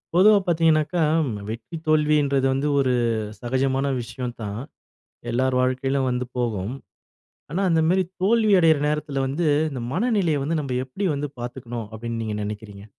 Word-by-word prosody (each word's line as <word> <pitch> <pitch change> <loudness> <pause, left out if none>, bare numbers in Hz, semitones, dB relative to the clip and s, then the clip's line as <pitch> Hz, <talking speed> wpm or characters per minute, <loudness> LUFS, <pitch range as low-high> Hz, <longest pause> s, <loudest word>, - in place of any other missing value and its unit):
பொதுவா 205 +3 +7
பார்த்தீங்கனாக்க, 160 -1 +2 0.5
வெற்றி 115 +9 -6
தோல்வி 155 -1 +3
என்றது 135 -1 +1
வந்து, 135 +2 0
ஒரு 130 -2 +2 0.5
சகஜமான 130 +2 0
விஷயம் 120 +1 -6
தான். 105 +1 -4 0.7
எல்லார் 130 +2 +1
வாழ்க்கையிலும் 130 +1 0
வந்து 125 0 -1
போகும். 110 -3 -1 0.8
ஆனா, 185 - -1
அந்த 165 -1 +3
மாதிரி 185 +1 +3 0.2
தோல்வி 215 +1 +4
அடைகிற 160 -3 +5
நேரத்தில 150 -2 -1
வந்து, 155 +5 -1 0.2
இந்த 130 -3 -5
மனநிலையை 195 - +1
வந்து 155 +3 0
நம்ப 135 -3 -3
எப்படி 190 +10 -3
வந்து 145 0 -3
பார்த்துக்கனும் 120 -2 -6
அப்டின்னு 115 +1 -4
நீங்க 110 -1 -3
நெனைக்கிறீங்க? 105 -1 -7
135 Hz, 145 wpm, -23 LUFS, 120-160 Hz, 0.8 s, பொதுவா